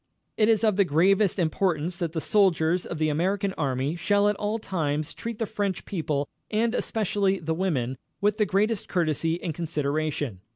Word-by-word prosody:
It 215 0 +3
is 225 0 +3
of 215 -3 +3
the 200 - +6
gravest 190 +5 +3
importance 170 0 0
that 170 -3 -2
the 165 - -1
soldiers 180 -4 +2
of 170 - -5
the 155 0 +1
American 190 +6 0
Army 135 0 -1
shall 205 +3 +2
at 210 - 0
all 210 +2 -1
times 155 -8 -2
treat 230 -1 -5
the 225 - -1
French 200 -3 -3
people, 150 -6 -2 0.2
and 225 +2 +1
especially 200 -5 0
the 160 -2 -2
women, 135 -8 -1 0.2
with 205 +1 +1
the 210 -2 +2
greatest 210 +2 +1
courtesy 165 -1 0
and 165 - -2
consideration. 150 - -2
180 Hz, 175 wpm, -26 LUFS, 155-205 Hz, 0.2 s, the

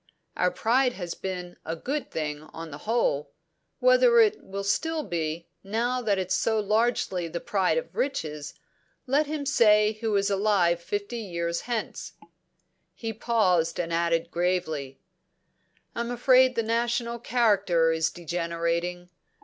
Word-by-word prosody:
"Our 180 - +2
pride 245 +6 +2
has 175 -5 -5
been 180 -2 -6
a 165 - -3
good 275 - -4
thing, 150 -2 -3
on 160 +1 -9
the 145 - -8
whole. 225 -11 +1 0.5
Whether - - +5
it 435 -1 +3
will 200 +1 -5
still 315 +10 0
be, 165 - -3 0.2
now 235 +5 -1
that 210 -4 +1
it's 185 0 -1
so 220 +2 +1
largely 210 -4 0
the 170 +1 -4
pride 195 - +1
of - - -4
riches, 150 - -3 0.5
let 280 +3 +2
him 300 -1 -3
say 215 -5 +4
who 220 -2 0
is 200 0 +1
alive 190 -4 +2
fifty 205 +6 -4
years 170 -5 -3
hence." 230 -3 -3 0.8
He 225 -1 -4
paused 185 -8 +1
and 170 -1 -2
added 170 0 0
gravely: 170 -6 -1 0.9
"I'm 235 0 -3
afraid 255 +1 +4
the 230 - +1
national 235 +1 -1
character 200 -9 +2
is 160 0 +1
degenerating. 170 +1 -3
200 Hz, 140 wpm, -26 LUFS, 170-235 Hz, 0.9 s, Whether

